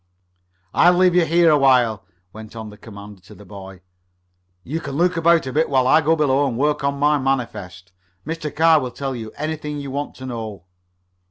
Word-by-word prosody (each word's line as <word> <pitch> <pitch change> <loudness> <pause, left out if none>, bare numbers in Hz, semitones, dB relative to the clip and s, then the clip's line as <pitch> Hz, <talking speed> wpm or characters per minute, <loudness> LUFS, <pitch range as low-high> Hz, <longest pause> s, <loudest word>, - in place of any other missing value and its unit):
"I'll 175 +1 +5
leave 180 0 +3
you 175 -1 +3
here 170 0 +4
a 150 - +4
while," 125 -6 +2 0.3
went 110 +1 -11
on 110 -2 -8
the - - -13
commander 105 -3 -12
to 95 - -16
the 105 - -15
boy. 95 -1 -11 0.8
"You 155 +9 -4
can 140 - -7
look 175 +3 +1
about 165 -2 +3
a 130 - -5
bit 160 +2 +1
while 130 -2 +2
I 155 +5 +4
go 160 +2 +2
below 145 -2 +1
and 120 -3 -4
work 150 +1 0
on 140 0 -1
my 145 +1 +2
manifest. 100 -9 -4 0.3
Mr. 160 -1 -4
Carr 160 0 +5
will 130 -3 -4
tell 135 +1 -5
you 110 -2 -7
anything 150 -1 -4
you 140 -1 -7
want 145 +2 -5
to 130 - -10
know." 110 -7 -7
135 Hz, 200 wpm, -20 LUFS, 110-155 Hz, 0.8 s, I'll